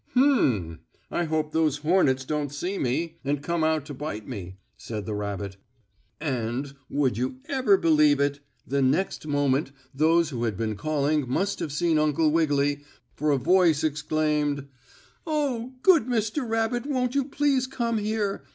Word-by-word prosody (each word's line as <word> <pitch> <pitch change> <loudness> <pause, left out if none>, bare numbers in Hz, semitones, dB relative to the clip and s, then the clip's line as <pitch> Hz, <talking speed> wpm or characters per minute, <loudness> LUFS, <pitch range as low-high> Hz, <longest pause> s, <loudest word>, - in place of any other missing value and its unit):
"Hum! 125 - +2 0.3
I 175 - 0
hope 155 -1 -1
those 155 -3 +1
hornets 150 -5 +2
don't 150 -1 -2
see 175 +7 -3
me, 155 +7 -2
and 140 +1 -1
come 170 0 -1
out 155 -2 +1
to 145 - -7
bite 135 -6 -6
me," 95 -7 -7 0.2
said 105 -3 -6
the 110 - -3
rabbit. 100 -1 -4 0.6
And, 130 -1 -2 0.2
would 130 -6 0
you 130 - -2
ever 260 -9 +3
believe 150 -4 +4
it? 140 0 +1 0.3
the 140 0 0
next 150 +5 0
moment 145 -1 +1 0.2
those 160 +3 +3
who 120 -3 -2
had 110 -4 -2
been 110 -1 -2
calling 150 +3 0
must 195 +10 0
have 150 - -3
seen 160 +1 +1
Uncle 155 +1 +2
Wiggily, 145 -3 +1 0.3
for 150 +1 -1
a 145 - +3
voice 170 +1 +3
exclaimed: 150 -1 0 0.6
"Oh, 265 -5 -1
good 330 -10 +5
Mr. 235 +2 -1
Rabbit 225 +3 0
won't 255 -3 0
you 280 -1 +2
please 275 -2 +1
come 235 -4 -1
here? 210 -1 -2
150 Hz, 160 wpm, -26 LUFS, 140-195 Hz, 0.6 s, good